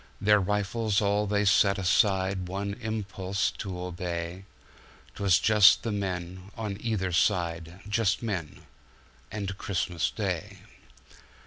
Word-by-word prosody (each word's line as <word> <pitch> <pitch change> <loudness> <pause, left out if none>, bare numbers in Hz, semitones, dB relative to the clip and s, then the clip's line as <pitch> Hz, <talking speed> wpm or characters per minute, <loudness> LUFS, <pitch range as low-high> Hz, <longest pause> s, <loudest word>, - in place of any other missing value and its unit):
"Their 105 +1 +4
rifles 105 +2 0
all 105 0 +1
they 105 0 +1
set 100 0 +4
aside, 95 -1 +1
One 100 +2 -3
impulse 100 -3 -2
to 95 -3 -5
obey;'Twas 90 +1 -3
just 105 +2 +6
the 115 - -2
men 95 -2 -4
on 105 -3 -4
either 105 -5 -1
side, 85 -1 0
Just 105 0 +1
men 95 -9 -4 0.3
— - - -30
and 100 -2 -4
Christmas 90 -3 -1
Day. - - -4
100 Hz, 115 wpm, -28 LUFS, 90-105 Hz, 0.3 s, just